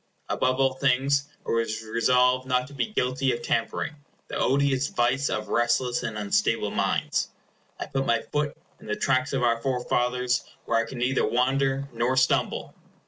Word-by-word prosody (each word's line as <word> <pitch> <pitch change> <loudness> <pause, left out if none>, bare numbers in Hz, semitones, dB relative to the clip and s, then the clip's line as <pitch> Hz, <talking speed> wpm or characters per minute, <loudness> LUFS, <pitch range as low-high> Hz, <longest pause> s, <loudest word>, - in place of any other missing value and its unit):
Above 130 +1 +1
all 135 -1 +3
things, 135 +1 +2 0.2
I - - -2
was 115 -1 -1
resolved 125 +3 +2
not 125 -1 +1
to 140 - -13
be 140 - -1
guilty 130 - 0
of 120 - -5
tampering, 115 +6 -1 0.4
the - - -5
odious 140 0 +2
vice 130 +3 +1
of 105 0 -3
restless 120 +1 +1
and 110 - -4
unstable 100 -1 +1
minds. - - 0 0.5
I - - -3
put 135 0 -2
my 115 -1 +2
foot 150 0 -1 0.2
in - - -14
the 105 - -1
tracks 130 0 +1
of 130 -2 0
our 115 -1 +2
forefathers, 125 -1 0 0.2
where 115 - +2
I - - -9
can 130 - -7
neither 125 +2 +1
wander 135 +2 +1
nor 120 +3 0
stumble. 130 - +1
125 Hz, 170 wpm, -26 LUFS, 120-135 Hz, 0.5 s, all